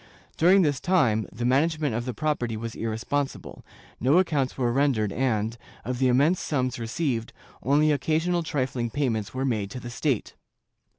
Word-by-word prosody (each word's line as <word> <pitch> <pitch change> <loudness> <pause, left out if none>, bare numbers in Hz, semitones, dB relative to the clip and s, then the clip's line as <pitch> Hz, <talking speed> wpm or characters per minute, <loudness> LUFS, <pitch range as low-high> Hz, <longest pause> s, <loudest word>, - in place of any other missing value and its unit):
During 185 +4 +5
this 145 -4 +1
time 115 - +2
the 120 +3 -4
management 150 +2 +1
of 120 +2 -2
the 125 - -3
property 125 -7 -1
was 115 +1 -5
irresponsible; 115 +5 -3 0.4
no 135 +8 +3
accounts 150 -8 +1
were 120 -3 +1
rendered 125 -7 +1
and, 115 -3 0 0.3
of 125 0 -3
the 130 - +3
immense 145 +8 +3
sums 130 -4 -1
received, 115 0 -2 0.3
only 145 +5 +3
occasional 160 +5 +1
trifling 130 -6 -2
payments 115 -5 -2
were 130 +1 -1
made 110 -6 -1
to 125 - -7
the 120 -1 -8
state. 130 -2 -1
130 Hz, 160 wpm, -26 LUFS, 115-150 Hz, 0.4 s, During